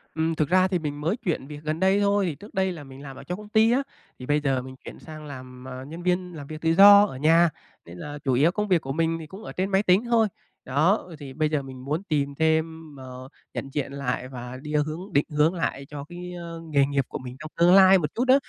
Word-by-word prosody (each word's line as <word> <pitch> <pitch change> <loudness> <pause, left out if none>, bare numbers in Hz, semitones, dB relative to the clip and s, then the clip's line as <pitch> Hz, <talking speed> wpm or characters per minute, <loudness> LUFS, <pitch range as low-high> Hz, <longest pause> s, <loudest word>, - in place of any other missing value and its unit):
Ừm, 160 0 0
thực 150 -2 0
ra 185 0 +4
thì 180 -2 -1
mình 145 -1 -5
mới 175 +10 0
chuyển 165 -9 -3
việc 150 0 -8
gần 155 +2 -2
đây 190 +2 +3
thôi, 200 -6 +1
trước 210 - -13
đây 190 -1 +1
là 160 -4 -8
mình 135 0 -12
làm 135 -2 -9
ở - - -11
trong 180 +2 -5
công 210 0 -11
ty 220 +1 +4
á, 270 +3 +2 0.4
thì 125 - -7
bây 145 +2 +2
giờ 135 -3 0
mình 130 +1 -10
chuyển - - -9
sang 155 -1 -10
làm, 130 -2 -10
à, 130 0 -7
nhân 165 +3 -8
viên 180 0 -1
làm 145 -2 -8
việc 155 +1 -8
tự 165 - +1
do 200 +2 +9
ở 130 - -7
nhà, 165 +4 +4 0.4
nên 85 +1 -11
là 145 +10 -7
chủ 135 -2 +1
yếu 150 +7 +4
công 210 +2 -2
việc 180 -4 +3
của 135 - -5
mình 165 +2 0
thì 155 - -9
cũng 195 +7 -11
ở - - -7
trên 190 +2 -2
máy 195 +2 +3
tính 190 +5 +3
thôi. 230 -2 +3 0.4
Đó, 155 +10 +3
ờ, 165 - -10
thì 135 -2 -9
bây 155 +1 0
giờ 150 -2 0
mình 130 -1 -10
muốn 155 +6 -2
tìm 145 -6 -1
thêm, 160 -1 -1
ờ, 130 0 -10 0.2
nhận 135 - -5
diện 140 -1 -3
lại 125 -2 -3
và 125 -1 -8
đi 150 +1 -7
hướng 155 +6 -2
định 140 - +3
hướng 150 +3 +2
lại 140 -5 -3
cho 145 -1 -7
cái 175 +3 -9 0.4
nghề 140 -1 +4
nghiệp 140 -2 -1
của - - -6
mình 125 0 -8
trong 155 0 -9
tương 175 +2 +5
lai 190 0 +8
một 155 -5 -3
chút 245 - 0
á, 260 - +7
155 Hz, 270 wpm, -25 LUFS, 140-180 Hz, 0.4 s, do